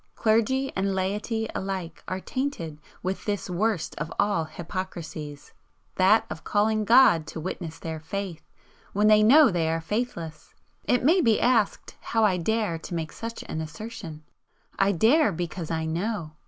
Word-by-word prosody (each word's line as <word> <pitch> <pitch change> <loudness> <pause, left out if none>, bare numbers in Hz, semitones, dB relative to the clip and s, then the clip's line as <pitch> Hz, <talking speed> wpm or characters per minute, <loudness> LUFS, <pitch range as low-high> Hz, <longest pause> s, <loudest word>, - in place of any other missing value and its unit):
Clergy 235 +5 +1
and 195 0 0
laity 210 +4 -1
alike 190 -4 -4
are 185 - -3
tainted 190 - -4 0.2
with 185 +1 -3
this 205 -3 -2
worst 200 -1 0
of 150 +2 -4
all 200 -6 +1
hypocrisies 160 -4 -7 0.4
that 195 +4 +4
of 160 - -7
calling 215 +1 +1
God 225 -9 +6
to - - -6
witness 165 -1 -5
their 160 -1 -5
faith 175 0 -5 0.5
when 205 +2 +2
they 215 0 +6
know 270 +5 +7
they 165 -3 0
are 165 0 0
faithless. 165 -4 -4 0.3
It 245 - +2
may 340 +7 +5
be 225 -7 +3
asked 235 -5 +1
how 225 -1 0
I 190 -3 +2
dare 205 -1 0
to 170 - -6
make 160 -2 -3
such 230 0 -6
an 160 - -4
assertion? 160 -1 -8 0.6
I 195 +1 +4
dare, 225 - +4
because 170 -1 -4
I 160 -1 -1
know! 170 +1 -2
190 Hz, 155 wpm, -26 LUFS, 165-220 Hz, 0.6 s, know